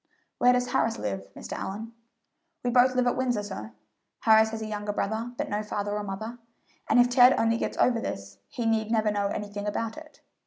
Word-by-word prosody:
"Where 250 Hz, -, +6 dB
does 250 Hz, 0 st, 0 dB
Harris 230 Hz, -3 st, +1 dB
live, 100 Hz, -1 st, -4 dB
Mr. -, -, -7 dB
Allyn?" 220 Hz, +4 st, -5 dB, 0.7 s
"We 245 Hz, -, 0 dB
both 255 Hz, +1 st, +4 dB
live 250 Hz, 0 st, +2 dB
at 245 Hz, -, +2 dB
Windsor, 245 Hz, -5 st, 0 dB
sir; 110 Hz, -, -7 dB, 0.5 s
Harris 220 Hz, 0 st, +5 dB
has 220 Hz, 0 st, -5 dB
a -, -, -4 dB
younger 210 Hz, -1 st, -3 dB
brother, 220 Hz, +4 st, -2 dB
but -, -, -2 dB
no 210 Hz, +1 st, -1 dB
father 205 Hz, -1 st, -3 dB
or 210 Hz, -, -2 dB
mother; 215 Hz, +5 st, -6 dB, 0.5 s
and -, -, +5 dB
if 245 Hz, -, +6 dB
Ted 245 Hz, +1 st, +6 dB
only 230 Hz, 0 st, +2 dB
gets -, -, -3 dB
over 235 Hz, -2 st, +3 dB
this, 100 Hz, -, -6 dB
he 235 Hz, -, -4 dB
need 220 Hz, -1 st, +1 dB
never 220 Hz, -2 st, +2 dB
know 205 Hz, -1 st, 0 dB
anything 205 Hz, 0 st, -4 dB
about 225 Hz, +4 st, -3 dB
it. 310 Hz, -1 st, -13 dB
220 Hz, 205 wpm, -27 LUFS, 205-245 Hz, 0.7 s, Where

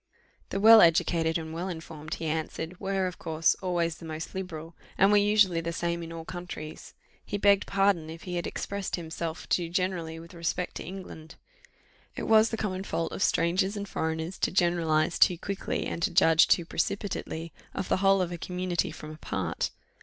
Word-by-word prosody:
The 195 Hz, -, -2 dB
well 220 Hz, +2 st, +9 dB
educated 165 Hz, 0 st, +3 dB
and 160 Hz, -1 st, -6 dB
well 170 Hz, +3 st, -3 dB
informed, 160 Hz, -2 st, -6 dB
he 165 Hz, -, -6 dB
answered, 160 Hz, +2 st, -3 dB
were, 195 Hz, -1 st, 0 dB
of 180 Hz, -2 st, -5 dB
course, 160 Hz, 0 st, +2 dB
always 170 Hz, -3 st, 0 dB
the 165 Hz, -, -11 dB
most 160 Hz, 0 st, -6 dB
liberal, 165 Hz, -3 st, -6 dB, 0.2 s
and 195 Hz, +1 st, +5 dB
were 210 Hz, -, +6 dB
usually 205 Hz, -4 st, +4 dB
the 170 Hz, 0 st, -3 dB
same 170 Hz, 0 st, -2 dB
in 165 Hz, 0 st, -7 dB
all 165 Hz, -1 st, -7 dB
countries. 175 Hz, -4 st, -8 dB, 0.3 s
He 205 Hz, -, -3 dB
begged 200 Hz, -1 st, +4 dB
pardon 195 Hz, -5 st, +2 dB
if 165 Hz, +1 st, -9 dB
he 180 Hz, -1 st, -5 dB
had 175 Hz, -, -2 dB
expressed 200 Hz, -1 st, -3 dB
himself 160 Hz, -1 st, -5 dB
too 170 Hz, -2 st, 0 dB
generally 175 Hz, -2 st, -2 dB
with 165 Hz, +2 st, -11 dB
respect 170 Hz, +1 st, -2 dB
to -, -, -6 dB
England. 175 Hz, -4 st, -9 dB, 0.8 s
It -, -, -4 dB
was 220 Hz, 0 st, +5 dB
the 225 Hz, -, -3 dB
common 190 Hz, -3 st, -2 dB
fault 165 Hz, -4 st, -2 dB
of -, -, -5 dB
strangers 185 Hz, +4 st, +2 dB
and 200 Hz, 0 st, -4 dB
foreigners 160 Hz, +1 st, -3 dB
to -, -, +2 dB
generalize 170 Hz, -3 st, +2 dB
too 180 Hz, -, +6 dB
quickly, 200 Hz, +3 st, -3 dB
and 170 Hz, -, -4 dB
to 195 Hz, -, +2 dB
judge 160 Hz, -3 st, +5 dB, 0.2 s
precipitately 170 Hz, -4 st, -3 dB, 0.2 s
of -, -, -2 dB
the -, -, +2 dB
whole 195 Hz, 0 st, +4 dB
of 175 Hz, -, -4 dB
a 175 Hz, -, -5 dB
community 180 Hz, -1 st, -1 dB
from 155 Hz, -, -9 dB
a 155 Hz, -, -10 dB
part. -, -, -2 dB
175 Hz, 190 wpm, -28 LUFS, 165-190 Hz, 0.8 s, well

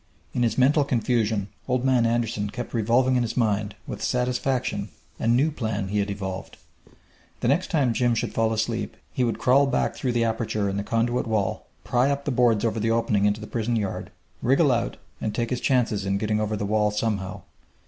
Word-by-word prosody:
In 125 Hz, -, -1 dB
his 120 Hz, -2 st, +1 dB
mental 145 Hz, +3 st, +4 dB
confusion 115 Hz, -5 st, 0 dB, 0.2 s
Old 125 Hz, 0 st, 0 dB
Man 125 Hz, -3 st, +3 dB
Anderson 115 Hz, -3 st, -1 dB
kept 120 Hz, +3 st, -6 dB
revolving 125 Hz, +3 st, +3 dB
in -, -, +2 dB
his 115 Hz, 0 st, -3 dB
mind, 105 Hz, -3 st, +1 dB
with -, -, -6 dB
satisfaction, 125 Hz, +1 st, -1 dB, 0.3 s
a -, -, -1 dB
new 130 Hz, +7 st, +3 dB
plan 110 Hz, -8 st, -3 dB
he 105 Hz, +1 st, 0 dB
had 100 Hz, 0 st, 0 dB
evolved. 95 Hz, -2 st, -5 dB, 0.8 s
The -, -, +1 dB
next 145 Hz, +8 st, +2 dB
time 140 Hz, -8 st, +2 dB
Jim 120 Hz, 0 st, +2 dB
should -, -, -2 dB
fall 115 Hz, 0 st, +1 dB
asleep 110 Hz, +1 st, -2 dB, 0.2 s
he 130 Hz, -, 0 dB
would 115 Hz, -, 0 dB
crawl 140 Hz, +3 st, +4 dB
back 125 Hz, -, 0 dB
through 125 Hz, -2 st, -2 dB
the 120 Hz, -1 st, +2 dB
aperture 110 Hz, -2 st, -1 dB
in 100 Hz, 0 st, -2 dB
the 100 Hz, -, -1 dB
conduit 115 Hz, +2 st, 0 dB
wall, 105 Hz, -3 st, -1 dB, 0.2 s
pry 125 Hz, +3 st, +2 dB
up 140 Hz, 0 st, -2 dB
the 145 Hz, -, 0 dB
boards 120 Hz, -3 st, +3 dB
over 115 Hz, 0 st, 0 dB
the 110 Hz, +1 st, 0 dB
opening 115 Hz, -3 st, +2 dB
into 105 Hz, +1 st, +1 dB
the -, -, -6 dB
prison 115 Hz, +1 st, -1 dB
yard, 105 Hz, -4 st, -2 dB, 0.3 s
wriggle -, -, +4 dB
out, -, -, -1 dB, 0.2 s
and 110 Hz, -, -2 dB
take 120 Hz, 0 st, -1 dB
his 125 Hz, -, -1 dB
chances 120 Hz, -6 st, +1 dB
in 95 Hz, +1 st, 0 dB
getting 105 Hz, +1 st, 0 dB
over 105 Hz, 0 st, -1 dB
the 100 Hz, -, -2 dB
wall 105 Hz, +1 st, +2 dB
somehow! 105 Hz, -3 st, -2 dB
115 Hz, 205 wpm, -25 LUFS, 105-125 Hz, 0.8 s, mental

